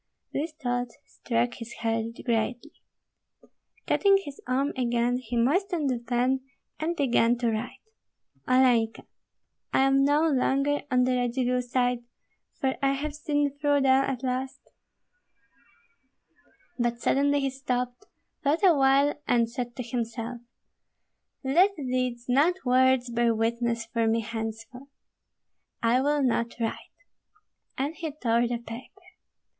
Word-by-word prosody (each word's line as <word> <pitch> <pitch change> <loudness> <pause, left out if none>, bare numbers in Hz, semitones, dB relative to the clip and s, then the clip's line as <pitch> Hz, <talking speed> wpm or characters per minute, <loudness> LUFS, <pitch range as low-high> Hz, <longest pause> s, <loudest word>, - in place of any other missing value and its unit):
This 310 +4 -2
thought 245 -5 -2 0.2
struck 240 0 -1
his 235 0 -9
heart 225 -1 0 0.2
greatly. 240 +4 -1 1.1
Cutting 395 -1 +4
his 285 -1 -9
arm 270 +3 0
again, 240 -1 +1
he 245 -1 -4
moistened 310 +4 +1
the 245 - -1
pen 250 +2 0 0.4
and 325 +2 -1
began 240 -5 +2
to 235 -1 0
write, 220 +3 -5 0.6
Olenka, 245 -3 +3 0.7
I - - +3
am 270 0 +4
no 290 +2 +3
longer 275 0 +1
on 250 -1 +3
the 255 - +1
Radzivill 250 +1 0
side, 245 -1 0 0.6
for 265 -3 0
I 275 0 +2
have 290 +2 -3
seen 290 -1 -1
through 290 -1 +2
them 265 0 +4
at 260 -1 -4
last 260 +1 -2 2.2
But 240 0 0
suddenly 285 +3 +2
he 270 -1 0
stopped, 250 +4 -3 0.4
thought 305 +6 +1
awhile, 280 -4 +5
and 235 -1 +3
said 240 -1 -5
to 250 - -4
himself, 235 0 -4 1.0
"Let 355 +10 +3
deeds, 255 -4 -2
not 285 +8 +3
words, 255 0 +3
bear 235 -1 +2
witness 230 +1 -1
for 230 -1 -1
me 225 +1 +2
henceforth; 225 +4 -6 0.9
I 235 +3 +3
will 290 +1 +1
not 235 -2 0
write." 225 -1 -1 1.0
And 280 +4 -1
he 325 -1 -5
tore 240 -4 +1
the 240 0 -2
paper. 235 +1 -9
250 Hz, 130 wpm, -27 LUFS, 235-275 Hz, 2.2 s, awhile